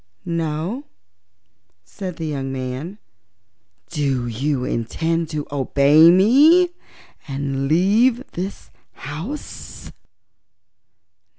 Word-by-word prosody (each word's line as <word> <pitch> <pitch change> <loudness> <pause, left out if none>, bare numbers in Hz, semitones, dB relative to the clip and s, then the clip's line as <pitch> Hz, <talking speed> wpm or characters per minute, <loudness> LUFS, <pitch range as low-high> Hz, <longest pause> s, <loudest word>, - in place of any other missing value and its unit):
"No," 170 - -3 1.0
said 185 - -7
the 165 - -5
young 135 -3 -3
man. 130 +8 -5 0.9
"Do 140 -6 -1
you 125 +3 -2
intend 160 +8 -2
to 150 -2 -4
obey 145 +3 +5
me, 280 - +6 0.6
and 135 -1 -2
leave 215 - +3
this 190 +3 -6 0.2
house?" 165 - -8
155 Hz, 80 wpm, -21 LUFS, 140-190 Hz, 1.0 s, me